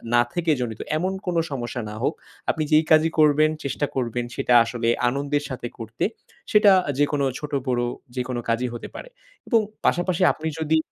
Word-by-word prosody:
না 120 Hz, -, +6 dB
থেকে 175 Hz, -2 st, +1 dB
জনিত, 115 Hz, -3 st, -4 dB, 0.2 s
এমন 185 Hz, +4 st, -1 dB
কোনো 175 Hz, -2 st, +1 dB
সমস্যা 125 Hz, -2 st, -4 dB
না 105 Hz, -, -7 dB
হোক। 150 Hz, -, +1 dB, 0.4 s
আপনি 155 Hz, -, 0 dB
যেই 155 Hz, +1 st, +6 dB
কাজই 155 Hz, +1 st, +5 dB
করবেন, 155 Hz, 0 st, +5 dB
চেষ্টা 140 Hz, +1 st, -1 dB
করবেন 120 Hz, -2 st, -1 dB
সেটা 125 Hz, -, +1 dB
আসলে 115 Hz, 0 st, -3 dB, 0.2 s
আনন্দের 145 Hz, +3 st, -1 dB
সাথে 125 Hz, -2 st, -5 dB
করতে। 115 Hz, 0 st, -5 dB, 0.5 s
সেটা 210 Hz, -1 st, +6 dB, 0.3 s
যেকোনো 145 Hz, -1 st, +2 dB
ছোট-বড় 135 Hz, -5 st, -1 dB, 0.3 s
যেকোনো 125 Hz, -1 st, -2 dB
কাজই 125 Hz, +2 st, 0 dB
হতে 120 Hz, -, -6 dB
পারে। -, -, -8 dB, 0.4 s
এবং 230 Hz, -, +4 dB, 0.3 s
পাশাপাশি 175 Hz, 0 st, +1 dB
আপনি 160 Hz, -, -5 dB
যদি 160 Hz, +1 st, +2 dB
145 Hz, 165 wpm, -24 LUFS, 125-160 Hz, 0.5 s, না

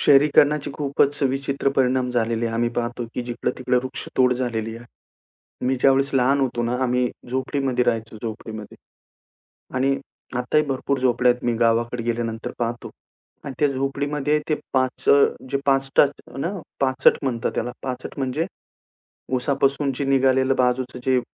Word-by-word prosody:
शहरीकरणाचे 145 Hz, +1 st, +4 dB
खूपच 145 Hz, 0 st, 0 dB
विचित्र 135 Hz, +1 st, 0 dB
परिणाम 130 Hz, -1 st, +2 dB
झालेले 115 Hz, -1 st, 0 dB
आहे. 115 Hz, -, -3 dB
आम्ही 120 Hz, +1 st, +1 dB
पाहतो, 120 Hz, 0 st, -2 dB
की 125 Hz, -, -2 dB
जिकडं-तिकडं 125 Hz, +1 st, -1 dB
वृक्षतोड 130 Hz, -1 st, 0 dB
झालेली 115 Hz, -3 st, -3 dB
आहे. 120 Hz, -, -12 dB, 0.8 s
मी 130 Hz, +1 st, +2 dB
ज्यावेळेस 135 Hz, 0 st, +4 dB
लहान 135 Hz, +2 st, +3 dB
होतो 120 Hz, -3 st, 0 dB
ना, 120 Hz, +1 st, 0 dB
आम्ही 125 Hz, 0 st, +1 dB, 0.2 s
झोपडीमध्ये 130 Hz, -1 st, 0 dB
राहायचो, 115 Hz, -2 st, -1 dB
झोपडीमध्ये 110 Hz, -1 st, -7 dB, 1.0 s
आणि 135 Hz, +1 st, +2 dB, 0.4 s
आताही 140 Hz, +5 st, +2 dB
भरपूर 135 Hz, 0 st, -1 dB
झोपड्या 125 Hz, -1 st, +3 dB
आहेत 125 Hz, -, -11 dB
मी 120 Hz, -, +2 dB
गावाकडे 115 Hz, +1 st, +1 dB
गेल्यानंतर 115 Hz, -1 st, -2 dB
पाहतो 120 Hz, 0 st, -3 dB, 0.5 s
आणि 140 Hz, -2 st, -6 dB
त्या 145 Hz, -, +3 dB
झोपडीमध्ये 140 Hz, +2 st, 0 dB
ते 155 Hz, -, +3 dB, 0.2 s
पाच 130 Hz, -1 st, 0 dB
अ, -, -, +9 dB, 0.4 s
जे 140 Hz, -, +1 dB
पाचट 135 Hz, +1 st, +4 dB, 0.3 s
ना, 165 Hz, +6 st, -1 dB, 0.3 s
पाचट 130 Hz, 0 st, +4 dB
म्हणतात 120 Hz, -4 st, -1 dB
त्याला 120 Hz, +1 st, -2 dB
पाचट. 130 Hz, +1 st, -5 dB
म्हणजे 135 Hz, +5 st, -1 dB, 0.9 s
उसापासून 135 Hz, +2 st, +1 dB
जे 140 Hz, -, -2 dB
निघालेलं 130 Hz, 0 st, +3 dB
बाजूचं 125 Hz, 0 st, 0 dB
जे 130 Hz, -1 st, +3 dB
130 Hz, 140 wpm, -23 LUFS, 120-135 Hz, 1.0 s, अ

